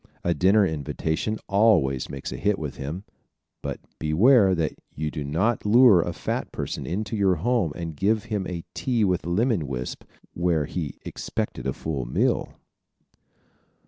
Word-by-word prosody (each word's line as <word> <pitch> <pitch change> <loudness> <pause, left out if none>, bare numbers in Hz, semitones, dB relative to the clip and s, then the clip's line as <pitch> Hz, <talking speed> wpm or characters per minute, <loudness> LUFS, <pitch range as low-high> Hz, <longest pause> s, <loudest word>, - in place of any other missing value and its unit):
A 85 - +2
dinner 95 +6 +4
invitation 80 +5 -2
always 95 - +3
makes 70 -1 -6
a - - -5
hit 105 0 +1
with 75 -3 -5
him, 75 +8 -5 0.6
but - - -4 0.2
beware 95 - +5
that 80 -4 -1 0.2
you 75 0 -2
do 75 - -4
not 95 +12 0
lure 110 -3 +7
a - - -2
fat - - -3
person - - -4
into 105 +5 -2
your 100 -3 +3
home 105 -1 +1
and 85 -3 -5
give 105 +6 +1
him 105 -5 -3
a 85 -2 -5
tea 120 -4 0
with 90 -3 0
lemon 100 - +1
wisp 65 -2 -5 0.3
where 85 -3 +1
he 80 -4 -4
expected 65 - -4
a 65 - 0
full 70 -4 -3
meal! - - 0
90 Hz, 155 wpm, -25 LUFS, 75-105 Hz, 0.6 s, lure